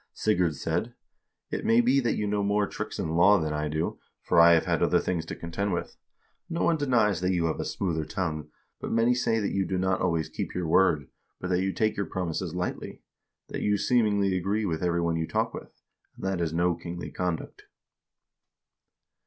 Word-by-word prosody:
Sigurd 90 -7 +1
said: 85 - -2 0.6
'It - - -3
may 115 +1 +4
be 125 +3 +4
that 120 -3 0
you 105 - -1
know 105 0 0
more 100 +1 +2
tricks - - -6
in - - -2
law 95 +5 +6
than 80 -2 -2
I 75 0 -1
do, 80 +2 -2 0.2
for - - +3
I 85 0 +8
have 80 - +3
had - - 0
other - - +3
things 85 -3 -2
to - - -5
contend 90 +4 -3
with. 85 - -4 0.5
No 170 0 -1
one 170 - +3
denies 115 - +2
that 90 +1 +1
you 85 -2 +1
have 80 - -1
a - - -1
smoother 85 -5 -2
tongue, 80 -4 -3 0.3
but - - -5
many 115 +2 +3
say 115 -2 +1
that 105 - -1
you 100 - +1
do 95 +1 -2
not 95 0 0
always 85 -3 +1
keep - - -5
your 90 -2 -2
word, 80 -5 +3 0.3
but 90 - -4
that 90 0 +2
you 95 0 0
take 110 +2 0
your 100 - -1
promises 90 -1 -3
lightly; 90 0 -4 0.5
that - - -4
you 105 0 +2
seemingly 100 -5 +2
agree 100 +4 0
with 80 -4 -2
every 85 -1 +1
one 85 -1 0
you 80 0 -2
talk - - -1
with, - - -8 0.4
and - - -8
that 95 -2 -1
is 80 -2 0
no 85 +2 +2
kingly 85 +1 -7
conduct.' 90 -3 -4
90 Hz, 210 wpm, -27 LUFS, 85-105 Hz, 0.6 s, I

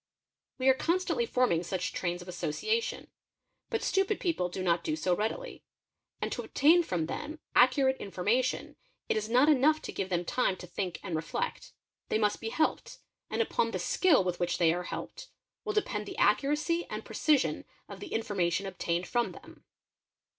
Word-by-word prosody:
5 - - -47
We 260 - +2
are 265 - +8
constantly 370 - 0
forming 250 - +2
such 180 +1 -3
trains 175 0 -2
of - - -18
association: 180 - -2 0.6
but 450 -2 -1
stupid 390 +2 +1
uy - - -19
people 325 - 0
do 185 +1 -4
not 170 -1 +2
do 155 - -1
so 175 +3 +1
readily; 225 - -4 0.6
and - - -2
to - - -2
obtain 325 +5 +4
from 175 - -1
them 305 - -5 0.2
accurate 265 +1 +4
informa 205 +6 +1
tion 255 - -4 0.3
it - - +2
is 215 0 -2
not 250 +5 +5
enough 305 +1 +4
to - - -5
give 190 -1 -3
them 175 -1 -1
time 195 -2 +1
to - - -9
think 180 0 -4
and 180 -5 -3
reflect; 165 - -3 0.4
they - - +2
must 210 -1 +1
be 225 - -3
helped, 315 +7 -1 0.3
and 460 - +1
upon 475 +1 0
the - - -2
skill 365 - +3
with 180 -1 -2
which 175 0 0
they 165 -2 +4
are 180 +1 -3
helped - - -7 0.3
will 420 - -2
depend 210 - -1
the, - - -7
accuracy 300 +9 +2
and - - -5
precision 295 -3 +1 0.2
of - - -9
the 395 - -8
information 195 -4 0
obtained 175 -2 -2
from 240 +3 0
them. - - -15
220 Hz, 185 wpm, -30 LUFS, -, 0.6 s, are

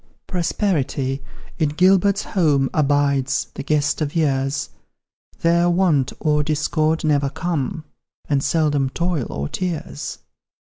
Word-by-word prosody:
Prosperity, 155 -7 -1 0.4
in 155 -3 +2
Gilbert's 190 +5 +3
home, 145 -8 +1
Abides 140 -3 +1
the - - -6
guest 150 +2 0
of 150 0 -2
years; 135 -3 0 0.7
There 170 +1 +3
Want 170 -7 +2
or 150 -1 +2
Discord 155 +1 0
never 145 -3 +2
come, 160 +1 -3 0.4
And 140 -2 +1
seldom 145 -4 +1
Toil 170 -3 -1
or 70 0 -3
Tears. 165 - -4
150 Hz, 110 wpm, -21 LUFS, 140-170 Hz, 0.7 s, Gilbert's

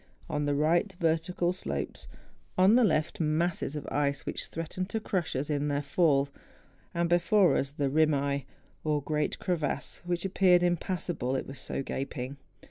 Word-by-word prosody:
On 150 -3 -1
the 145 0 +1
right, 170 +7 +2
vertical 170 +2 +1
slopes; 185 - -4 0.5
on 185 +3 +6
the 250 +1 +6
left, 155 -6 +1
masses 160 -1 0
of 150 - -5
ice 140 -1 0
which - - -2
threatened 165 +3 -4
to 220 - -1
crush 185 -8 -2
us 135 +3 -1
in 145 -1 0
their 145 0 0
fall; 145 -1 +3 0.6
and 170 0 0
before 175 -1 +4
us 135 - 0
the 145 -1 -1
rimaye, 140 -1 +2 0.4
or 150 -2 0
great 150 0 -1
crevasse, 175 -6 -2
which 175 +1 -2
appeared 185 -2 +4
impassable, 175 -6 -1
it 130 - -2
was 135 - -9
so - - -3
gaping. 135 0 -4
155 Hz, 160 wpm, -29 LUFS, 145-175 Hz, 0.6 s, on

